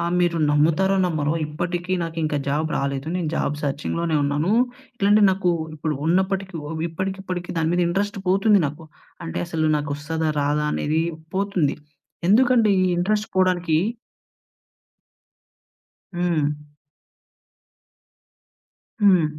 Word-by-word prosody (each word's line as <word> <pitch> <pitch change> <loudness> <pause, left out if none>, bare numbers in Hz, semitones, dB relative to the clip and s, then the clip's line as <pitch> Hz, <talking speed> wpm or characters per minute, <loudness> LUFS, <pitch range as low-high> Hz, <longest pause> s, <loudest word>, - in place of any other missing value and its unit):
ఆహ్, 170 +1 -1
మీరు 170 -1 +1
నమ్ముతారో, 165 +6 +3
నమ్మరో 155 -2 0
ఇప్పటికి 175 +3 -3
నాకింకా 160 -3 -2
జాబ్ 155 +3 0
రాలేదు. 140 +1 -2
నేను 170 -4 -2
జాబ్ 145 - 0
సర్చింగ్‌లోనే 155 +3 -1
ఉన్నాను. 150 +7 0 0.4
ఇట్లాంటియి 205 0 +5
నాకు 185 -2 +1 0.2
ఇప్పుడు 155 0 -2
ఉన్నప్పటికి 190 +2 0
ఒ - - -6 0.2
ఇప్పటికిప్పటికి 185 +1 -4
దాని 160 0 +1
మీద 180 - +2
ఇంట్రస్ట్ 200 +3 -1
పోతుంది 195 +1 +4
నాకు. 150 +3 -8 0.4
అంటే, 165 - -4
అసలు 160 -2 -1
నాకొస్తాదా, 150 +2 -2
రాదా 150 +1 +1
అనేది 155 +2 0 0.3
పోతుంది. 195 -7 0 0.5
ఎందుకంటే 235 +1 +5
ఈ - - +3
ఇంట్రస్ట్ 210 +4 0
పోడానికి 180 -4 +2 2.4
హ్మ్. 175 -3 +1 2.6
హ్మ్. 185 -5 +6
170 Hz, 110 wpm, -23 LUFS, 155-190 Hz, 2.6 s, హ్మ్